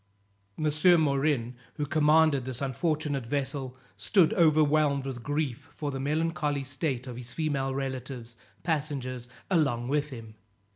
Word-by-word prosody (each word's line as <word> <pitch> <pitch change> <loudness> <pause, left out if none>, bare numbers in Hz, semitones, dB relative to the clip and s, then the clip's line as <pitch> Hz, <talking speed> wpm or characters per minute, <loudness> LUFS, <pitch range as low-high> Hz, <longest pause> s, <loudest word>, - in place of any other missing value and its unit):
M. 155 +3 +4
Morin, 140 -4 +1 0.2
who 150 - -2
commanded 150 -1 +4
this 130 -1 -4
unfortunate 140 -1 -1
vessel, 135 -1 -3 0.2
stood 190 -3 +3
overwhelmed 155 -5 +3
with 130 -3 -5
grief 145 0 -2
for 145 -2 -3
the 135 - -4
melancholy 150 0 0
state 130 -1 -2
of 125 -2 -7
his 125 0 -5
female 135 -2 -1
relatives, 130 -3 -5 0.3
passengers 140 -6 -2 0.2
along 135 -8 +1
with 150 +1 0
him. 115 -5 -9
140 Hz, 130 wpm, -28 LUFS, 130-155 Hz, 0.3 s, M